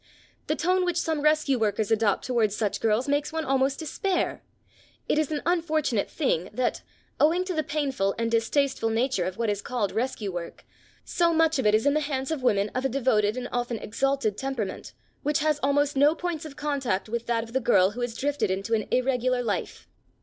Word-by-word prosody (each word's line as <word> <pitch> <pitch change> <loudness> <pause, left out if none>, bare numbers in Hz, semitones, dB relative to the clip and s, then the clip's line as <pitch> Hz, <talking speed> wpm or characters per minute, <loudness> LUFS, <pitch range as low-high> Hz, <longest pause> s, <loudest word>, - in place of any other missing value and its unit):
The 305 - +1
tone 365 +3 +1
which 355 -1 0
some 320 -3 0
rescue 300 -3 +2
workers 215 -1 0
adopt 220 -3 +2
towards 230 -5 +1
such 210 -2 -1
girls 225 +4 +1
makes 290 +1 0
one 320 0 -2
almost 270 +1 +1
despair. 360 +4 -2 0.7
It 300 - +2
is 310 -1 0
an 300 - -2
unfortunate 315 - 0
thing 185 - -1
that, 255 +3 -1 0.4
owing 340 +5 +3
to 370 - -3
the 315 - +1
painful 270 -10 -1
and 230 0 -1
distasteful 235 +1 +1
nature 225 -4 0
of 185 0 -4
what 230 -2 0
is 205 0 -3
called 235 -5 -2
rescue 225 -4 -2
work, 175 -1 -7 0.4
so 340 -1 +2
much 320 -2 +3
of 225 - +2
it 210 - +5
is 220 - +1
in 285 - +4
the 305 - +2
hands 275 -2 -2
of 310 -4 -2
women 205 -4 +2
of 255 - -2
a 270 - +1
devoted 230 -4 +1
and 250 -1 -3
often 245 -1 -2
exalted 225 0 -1
temperament, 265 -7 -4 0.3
which 295 0 +1
has 300 -1 +1
almost 285 +1 +2
no 290 +3 +4
points 340 -2 -4
of 295 -3 -9
contact 275 -11 -1
with 235 +1 -4
that 230 -1 +1
of 230 0 -12
the 265 - +2
girl 200 -6 +4
who 245 +4 -6
has 235 -1 -3
drifted 280 -7 0
into 195 +4 -2
an 215 -2 0
irregular 255 -1 +1
life. 210 -4 -3
260 Hz, 205 wpm, -26 LUFS, 225-295 Hz, 0.7 s, it